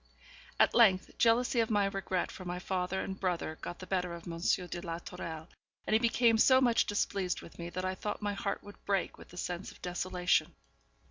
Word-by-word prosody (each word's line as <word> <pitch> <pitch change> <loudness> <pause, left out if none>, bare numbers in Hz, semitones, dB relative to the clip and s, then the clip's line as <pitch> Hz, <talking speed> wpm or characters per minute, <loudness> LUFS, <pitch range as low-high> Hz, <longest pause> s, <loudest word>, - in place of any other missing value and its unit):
At - - +5
length, 195 -6 +4
jealousy 235 +1 +4
of 225 - +2
my 205 -2 +3
regret 195 -2 -2
for 185 - -9
my 180 0 -4
father 185 +1 -2
and 190 0 -5
brother 175 -4 -2
got 175 - -6
the 185 - -9
better 180 -2 -1
of 170 - -11
M. 165 -1 -5
de 175 0 0
la 165 -2 -4
Tourelle, 160 -2 -7 0.4
and - - -1
he 220 - +6
became 230 -1 +3
so 260 +3 +7
much 240 -3 +3
displeased 195 -3 -1
with 165 - -13
me 170 0 -4
that 185 +1 -4
I 185 - 0
thought 205 +2 -4
my 205 -1 -2
heart 200 0 -3
would 205 - -13
break 195 -3 -1
with - - -13
the 180 - -13
sense 180 +1 -4
of - - -17
desolation. 180 0 0
185 Hz, 210 wpm, -32 LUFS, 175-205 Hz, 0.4 s, so